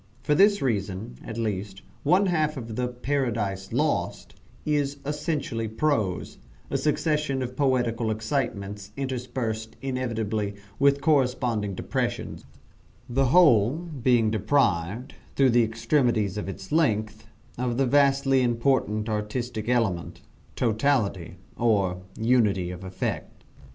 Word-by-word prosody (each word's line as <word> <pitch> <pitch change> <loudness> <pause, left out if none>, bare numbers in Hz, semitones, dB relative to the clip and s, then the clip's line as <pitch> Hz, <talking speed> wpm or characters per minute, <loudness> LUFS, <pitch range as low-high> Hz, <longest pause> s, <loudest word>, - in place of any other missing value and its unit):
For 150 - +2
this 200 +4 +4
reason, 105 -2 -2
at 110 - -7
least, 100 -3 -3 0.2
one 190 +3 +4
half 155 -4 +1
of 115 -3 -6
the 125 +1 0
"Paradise 120 -7 -2
Lost" - - -1 0.3
is 145 -2 0
essentially 145 -6 -2
prose 110 -5 -1 0.3
a 135 - +1
succession 150 -2 0
of 125 0 -6
poetical 125 -4 +1
excitements 105 -3 -3
interspersed, 120 -4 -3
inevitably, 110 -6 -2 0.2
with 140 0 +4
corresponding 125 -8 +1
depressions - - -3 0.6
the 135 +2 +1
whole 125 - +5
being 130 -9 +1
deprived, 110 -1 +1 0.2
through 135 -2 +4
the 120 0 +5
extremeness 115 -3 +1
of 105 -2 -4
its 95 0 -8
length, 110 -8 0 0.3
of 125 -1 -1
the 135 - +3
vastly 135 0 +3
important 115 -3 +1
artistic 110 +1 -3
element, 110 -9 0 0.3
totality, 110 - 0 0.2
or 100 -6 +2 0.2
unity 105 -6 +2
of 90 +1 -8
effect. 95 0 -4
120 Hz, 115 wpm, -26 LUFS, 105-135 Hz, 0.6 s, whole